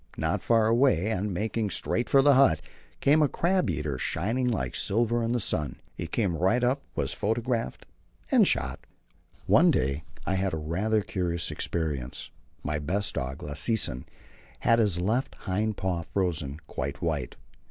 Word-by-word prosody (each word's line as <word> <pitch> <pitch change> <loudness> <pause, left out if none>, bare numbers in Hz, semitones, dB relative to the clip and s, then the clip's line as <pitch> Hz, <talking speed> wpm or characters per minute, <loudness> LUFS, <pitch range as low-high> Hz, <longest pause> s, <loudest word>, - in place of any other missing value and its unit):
Not - - -1
far 115 -2 +3
away, 115 - +3
and 100 0 -1
making 110 +3 -1
straight 120 +4 -1
for 135 -1 +5
the 145 0 +6
hut, 130 - +5 0.4
came 150 +3 +4
a 150 - +5
crab 180 +5 +1
eater, 75 -4 -2
shining 115 +10 -1
like 65 - -2
silver 115 +3 +1
in 115 0 -1
the 120 - +1
sun. 75 - -1
He 85 - -5
came 95 0 0
right 95 +9 +2
up, 130 +3 +1
was 70 -2 -1
photographed, 115 - -2 0.5
and - - +5
shot. - - 0 0.7
One - - +5
day 70 +3 +1 0.2
I 95 - 0
had 95 -2 0
a - - -3
rather 95 +8 0
curious 85 -3 -1
experience. 75 -7 -3 0.3
My 75 +2 -2
best 95 +7 -1
dog, 65 +2 -4
Lassesen, 75 - +1 0.6
had 115 0 +4
his 100 -6 +2
left 110 +9 -1
hind 105 +2 -1
paw 95 -3 -1
frozen 80 -6 -2
quite 70 +3 -5
white. 75 -7 -2
95 Hz, 160 wpm, -27 LUFS, 80-115 Hz, 0.7 s, the